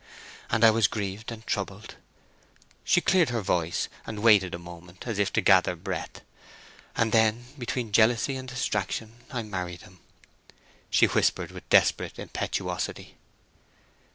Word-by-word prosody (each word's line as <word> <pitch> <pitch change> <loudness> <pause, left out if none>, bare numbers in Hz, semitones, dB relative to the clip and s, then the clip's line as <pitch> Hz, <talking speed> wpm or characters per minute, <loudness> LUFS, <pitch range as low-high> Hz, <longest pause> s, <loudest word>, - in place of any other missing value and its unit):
And 115 - +1
I 115 - +9
was 110 -2 +3
grieved 100 +2 -5
and 110 -1 -9
troubled—" 100 +1 -4 0.9
She 175 - +3
cleared 180 -6 +3
her 115 -3 -2
voice, 85 -3 0 0.2
and 105 -1 -6
waited 100 -6 +5
a - - -5
moment, 85 +1 -12
as 115 -4 -3
if 100 0 +1
to - - +2
gather 95 -2 +4
breath. 95 +2 -6 0.7
"And 115 -1 +1
then, 110 +1 +3
between 120 -4 -4
jealousy 115 +5 +3
and 130 0 -6
distraction, 115 -2 -3
I 125 -5 -3
married 90 -4 -5
him!" 90 0 -17 0.9
she - - +5
whispered - - +1
with - - -12
desperate - - +3
impetuosity. - - -4
110 Hz, 140 wpm, -27 LUFS, 95-115 Hz, 0.9 s, I